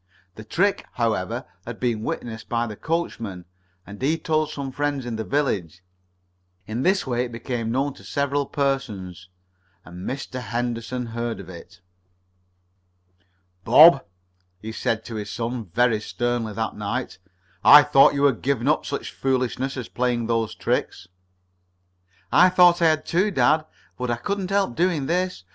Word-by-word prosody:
The 110 - -10
trick, 195 - 0
however, 110 -6 -1 0.2
had - - -8
been 120 -4 -1
witnessed 110 0 -5
by 120 0 0
the 110 -2 -6
coachman, 115 - -3 0.4
and 100 +3 -11
he 150 +5 +1
told 155 -2 0
some 140 -3 -5
friends 145 -1 -2
in 120 -2 -4
the 110 - -3
village. 90 - -2 0.8
In 110 +3 -4
this 190 +5 +2
way 125 -1 -1
it 120 - -8
became 115 -1 -4
known 135 +3 0
to - - -16
several 140 0 -1
persons, 100 -11 -3 0.6
and 90 +1 -7
Mr. 130 -1 -5
Henderson 120 +1 -3
heard 115 0 -4
of 95 -2 -10
it. 85 0 -12 1.8
"Bob," 140 - +8 0.6
he 110 +3 -7
said 110 0 -2
to 115 -2 -6
his 105 -1 -5
son 120 +1 -4
very 115 +5 +1
sternly 120 0 -2
that 110 +1 -3
night, 105 +1 -4 0.4
"I 145 0 +10
thought 145 -1 +5
you 140 - 0
had 140 -5 +3
given 135 -2 0
up 150 - +1
such 140 - -4
foolishness 130 0 -1
as 125 -3 -5
playing 120 -2 -1
those 115 -1 -1
tricks." 90 - -2 1.2
"I 180 +1 +6
thought 175 -1 +5
I 165 - +6
had, 155 -1 +1
too, 185 +5 +1
dad, 155 -5 +2 0.3
but 125 -1 -2
I 120 - +1
couldn't 190 +9 -3
help 195 -11 0
doing 170 -5 +1
this. 180 - -1
125 Hz, 155 wpm, -23 LUFS, 110-145 Hz, 1.8 s, I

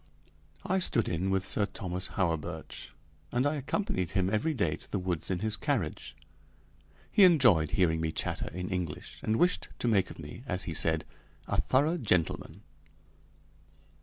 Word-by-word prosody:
I 190 +1 +1
stood 120 - +3
in 90 +3 -1
with 95 -1 0
Sir 100 - +1
Thomas 90 -3 -3
Hawerburch, 85 -6 -2 0.4
and 125 +2 +1
I 145 - +2
accompanied 140 - -1
him 95 +1 0
every 150 +9 +1
day 110 - +1
to - - -14
the - - -1
woods 90 -3 -3
in 90 -1 -1
his 110 0 +1
carriage. - - -2 1.0
He 205 - +7
enjoyed 120 - +5
hearing 80 -3 +3
me 80 -1 0
chatter - - -2
in 90 +1 -4
English, 90 -5 -4
and 110 - 0
wished 180 +5 +2
to - - -2
make 100 -5 +3
of - - -10
me, 75 +8 -9
as 90 -4 -1
he 85 - -4
said, 80 0 +2 0.4
a - - +1
thorough 150 +6 +2
gentleman. 90 - 0
95 Hz, 165 wpm, -30 LUFS, 85-120 Hz, 1.0 s, He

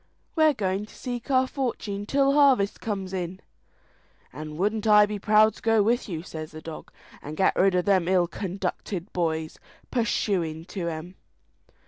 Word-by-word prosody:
"We're 315 -3 +4
going 195 0 -2
to - - -16
seek 245 0 -6
our 260 -1 +4
fortune 225 -7 -3
till 275 +1 +3
harvest 270 -9 +4
comes 195 -3 -4
in." 185 0 -4 0.9
"And 155 +2 -7
wouldn't 210 +4 0
I 210 -1 +7
be 205 0 -5
proud 215 +2 +5
to - - -15
go 225 -2 +3
with 235 +2 +1
you!" 165 -3 -4
says 155 -3 -7
the 155 - -9
dog, 160 0 -9 0.3
"and 150 +2 -7
get 190 - +3
rid 190 0 +3
of 180 - +1
them 190 -4 +3
ill 185 -1 +3
conducted 190 0 -4
boys; 160 -2 -2 0.3
purshuin' 185 -9 0
to 180 -4 -4
'em." 170 +3 -6
195 Hz, 165 wpm, -26 LUFS, 170-220 Hz, 0.9 s, I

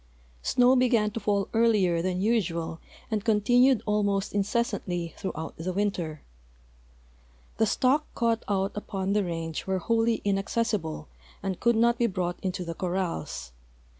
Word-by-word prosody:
Snow 250 - +4
began 235 -4 +3
to 230 - -4
fall 200 -2 0
earlier 210 -7 +3
than 185 +1 -1
usual 170 -7 0 0.3
and 215 -2 0
continued 245 +3 +4
almost 205 -2 0
incessantly 195 -5 -1
throughout 160 -5 -5
the 175 +3 -3
winter. 175 -6 -2 1.4
'Fhe 220 - +4
stock 270 +7 +2
caught 230 -1 +1
out 195 -1 0
U})on 195 -2 -3
the 210 -1 +2
range 165 -2 -4
were 190 0 +1
wholly 225 +4 +1
inaccessible 195 -5 -1 0.4
and 190 -2 -2
could 235 0 +3
not 235 +1 +3
be 235 - +3
brought 180 -3 -2
into 185 -1 -3
the 170 - -4
cor 180 +1 -3
rals. 80 - -3
200 Hz, 140 wpm, -27 LUFS, 180-230 Hz, 1.4 s, Snow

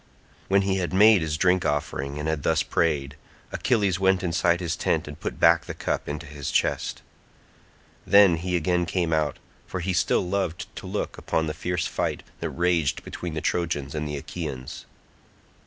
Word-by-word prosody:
When 100 0 +3
he 95 0 +1
had 90 -1 -2
made 105 0 +6
his 75 -1 -1
drink 90 +1 +3
offering 70 -1 -2
and 75 +1 -3
had 80 -2 -1
thus - - +2
prayed, 75 -4 0 0.4
Achilles 100 -7 +1
went 95 -1 +3
inside 85 0 +2
his 85 -2 -2
tent 80 -2 0
and 75 +2 -9
put - - -5
back 85 0 +5
the - - -6
cup - - -2
into 75 0 -5
his 70 -1 -6
chest. - - 0 1.0
Then 100 -4 +7
he 90 +2 -2
again 85 +1 +1
came 85 0 0
out, 75 -2 0 0.3
for 95 - -4
he 90 +2 -1
still 90 +1 +1
loved 90 -3 -2
to - - -7
look - - -3
upon 80 - 0
the 75 - -3
fierce 85 +1 -2
fight - - -2 0.2
that - - -3
raged 85 -4 0
between 85 -3 -6
the 80 - -2
Trojans 80 -6 -1
and 75 -1 -3
Achaeans. 70 -2 -6
85 Hz, 175 wpm, -25 LUFS, 75-90 Hz, 1.0 s, Then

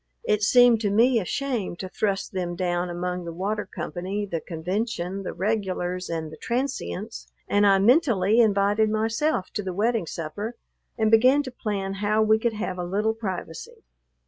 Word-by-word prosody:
It 210 - +1
seemed 240 +1 +5
to 205 - +1
me 230 +4 +4
a 195 - -4
shame 245 -6 -2
to 185 - -6
thrust 195 0 -2
them 175 -2 -2
down 175 0 -1
among 180 +1 -3
the 170 - -6
water 200 +5 -3
company, 185 +4 -4
the 170 -5 -4
convention, 185 +2 -3
the 195 - -4
regulars, 185 -2 -2
and 160 -2 -4
the 155 - -10
transients, 85 - -4 0.2
and 205 0 +3
I 195 -1 +6
mentally 225 - +4
invited 210 0 +3
myself 220 +2 0
to 210 - -3
the 190 -2 -4
wedding 215 -1 0
supper 175 +10 -5 0.4
and 220 -1 +2
began 255 +6 +5
to 260 - -7
plan 200 -5 -3
how 215 +1 +2
we 220 0 +4
could 235 0 0
have 205 -4 -4
a - - -2
little 205 +5 0
privacy. 190 -7 -6
205 Hz, 170 wpm, -25 LUFS, 180-220 Hz, 0.4 s, I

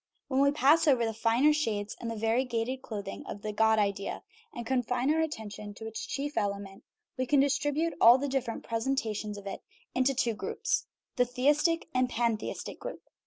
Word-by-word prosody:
When 265 -1 +1
we 280 - +5
pass 295 +3 +4
over 255 -5 +4
the 225 - -2
finer 230 +7 +3
shades 215 -9 -1
and 230 - -3
the 230 - -3
varie 225 +3 +1
gated 250 +1 -2
clothing 205 -3 -6
of 200 - -7
the 215 0 -3
God 220 +1 +4
idea 200 -1 -1 0.3
and 235 - -6
confine 250 +2 +1
our 320 - +2
atten 225 -10 -3
tion 205 0 -8
to 220 - -9
its 220 0 -5
chief 290 +1 -3
element, 200 -1 -4 0.4
we 255 - 0
can 285 +1 +4
distribute 290 +4 +1
all 235 +2 +9
the 280 +2 -2
dif 265 -2 0
ferent 230 - -5
presentations 225 -3 -2
of 200 - -10
it 195 - -5 0.3
in 255 - +2
two 255 -3 +1
groups 450 - -2 0.3
the 250 - +4
theistic 295 +7 +2
and 255 0 +2
pantheistic 230 -2 -2
group. - - -7
245 Hz, 195 wpm, -30 LUFS, 220-280 Hz, 0.4 s, all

